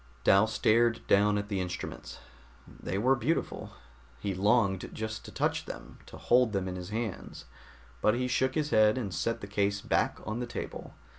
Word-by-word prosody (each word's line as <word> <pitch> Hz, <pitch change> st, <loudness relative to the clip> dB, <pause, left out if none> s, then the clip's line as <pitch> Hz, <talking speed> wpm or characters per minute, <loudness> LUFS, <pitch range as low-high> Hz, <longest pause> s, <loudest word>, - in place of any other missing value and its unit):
Dal 100 Hz, -, +5 dB
stared 115 Hz, +2 st, +2 dB
down 105 Hz, +1 st, +4 dB
at 100 Hz, 0 st, -3 dB
the 100 Hz, -2 st, -1 dB
instruments. 90 Hz, -1 st, -6 dB, 0.5 s
They 95 Hz, -, -5 dB
were 130 Hz, +6 st, +3 dB
beautiful. 140 Hz, +8 st, -2 dB, 0.5 s
He 100 Hz, -, -2 dB
longed 100 Hz, 0 st, +2 dB
just 110 Hz, 0 st, -5 dB
to -, -, -9 dB
touch -, -, -1 dB
them, -, -, -9 dB
to -, -, -10 dB
hold 120 Hz, -2 st, +3 dB
them 95 Hz, -2 st, -1 dB
in 90 Hz, -, -4 dB
his 90 Hz, 0 st, -7 dB
hands, 110 Hz, -2 st, -5 dB, 0.6 s
but 105 Hz, -, +3 dB
he 125 Hz, +1 st, -1 dB
shook 130 Hz, +1 st, +1 dB
his 150 Hz, -1 st, 0 dB
head 110 Hz, +1 st, +5 dB
and 105 Hz, -7 st, -3 dB
set 115 Hz, +5 st, -1 dB
the -, -, -5 dB
case 100 Hz, 0 st, 0 dB
back -, -, 0 dB
on 110 Hz, +3 st, -3 dB
the 125 Hz, -, -3 dB
table. 120 Hz, -, -7 dB
110 Hz, 180 wpm, -30 LUFS, 100-120 Hz, 0.6 s, Dal